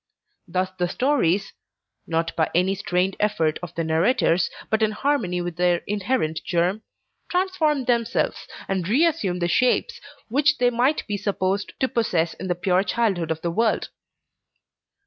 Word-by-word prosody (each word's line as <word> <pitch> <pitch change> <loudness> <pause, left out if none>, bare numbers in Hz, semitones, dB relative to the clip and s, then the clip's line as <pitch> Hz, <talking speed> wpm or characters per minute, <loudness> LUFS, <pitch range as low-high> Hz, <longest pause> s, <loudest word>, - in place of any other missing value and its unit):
Thus 185 0 -1
the 175 -1 +1
stories 200 - +1 0.5
(not 165 0 -1
by 160 - +1
any 180 +2 +3
strained 185 -1 0
effort 185 -8 +1
of 175 -1 -8
the 165 - -1
narrator's, 170 +2 +2 0.2
but 220 0 +2
in 220 - +3
harmony 210 -9 0
with 175 -1 -5
their 175 -1 +2
inherent 200 -5 -1
germ) 180 +4 0 0.5
transform 345 -7 +1
themselves, 235 -2 0 0.2
and 190 -2 -2
re 275 +10 +4
assume 250 - 0
the 175 -1 0
shapes 255 - +1 0.3
which 285 +6 +2
they 245 0 +3
might 250 +6 +1
be 205 -2 -2
supposed 200 0 -1
to 260 - +2
possess 175 -10 0
in 190 - -7
the 180 - 0
pure 180 +1 +2
childhood 195 -6 0
of 160 0 -2
the 170 - -1
world. 225 +5 +1
195 Hz, 155 wpm, -23 LUFS, 175-240 Hz, 0.5 s, re